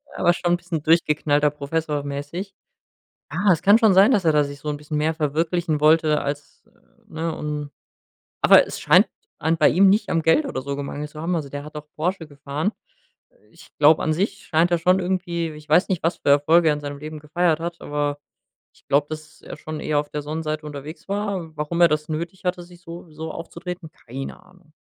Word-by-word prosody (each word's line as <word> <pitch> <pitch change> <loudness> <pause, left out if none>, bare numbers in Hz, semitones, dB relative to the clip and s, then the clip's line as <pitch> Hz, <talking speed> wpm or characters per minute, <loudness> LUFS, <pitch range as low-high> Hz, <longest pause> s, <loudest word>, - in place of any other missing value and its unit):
Aber 175 - +3
schon 175 0 0
bisschen 175 -4 -5
durchgeknallter 150 -2 +3
Professor 150 0 -3
mäßig. 145 +8 -5 0.8
Ah, 185 +4 +2
es 165 - 0
kann 205 +4 +6
schon 220 -4 +5
sein, 195 +6 +6
dass 200 -7 +2
er 160 - +4
da 150 -1 +3
sich 140 0 -8
so 150 - -6
'n 150 - -1
bisschen 150 +1 -6
mehr 155 +2 +1
verwirklichen 160 +1 -1
wollte 155 0 +4
als, 145 +1 -6 0.4
ne, 160 0 -4
und 150 -1 -4 0.7
Aber - - +7
es - - -7
scheint - - +5 0.3
an 160 +2 +1
bei 155 - +5
ihm 190 +4 +5
nicht 205 +3 +2
am 165 - +1
Geld 165 - +3
oder 265 - -4
so 140 +1 -4
gemangelt 145 +1 -5
zu 150 - -11
haben. 175 +2 -1
Also, 145 -4 -3
der 145 +1 -6
hat 150 +1 -12
auch 150 0 -8
Porsche 170 +1 -2
gefahren. 145 +6 -3 0.8
Ich - - -17
glaube, 150 +1 +5
an 155 - +1
sich 195 +4 -2
scheint 165 +2 +2
er 175 - +2
schon 180 +3 +3
irgendwie 175 -2 -2
ich 150 0 -13
weiß 175 +8 +4
nicht, 185 -4 -1
was 165 +2 0
für 140 - 0
Erfolge 160 +4 +5
er 150 - +3
in 150 - -6
seinem 145 -1 -6
Leben 155 +1 -7
gefeiert 165 +1 0
hat, 170 0 -5
aber 145 0 -2 0.5
ich - - -28
glaube, 145 +1 +2
dass 155 0 -9
er - - -9
schon 155 0 -7
eher 150 -1 0
auf 145 - -9
der 150 - -4
Sonnenseite 155 +1 -4
unterwegs 150 +4 -9
war. 195 -6 -3
Warum 150 +3 -2
er 170 - +7
das 150 0 -1
nötig 170 +5 -5
hatte, 180 0 -1
sich 175 0 -15
so 170 0 -10
so 160 +1 -7
aufzutreten? 170 0 -7
Keine 135 +8 -8
Ahnung. 180 -3 -23
160 Hz, 210 wpm, -23 LUFS, 150-175 Hz, 0.8 s, Aber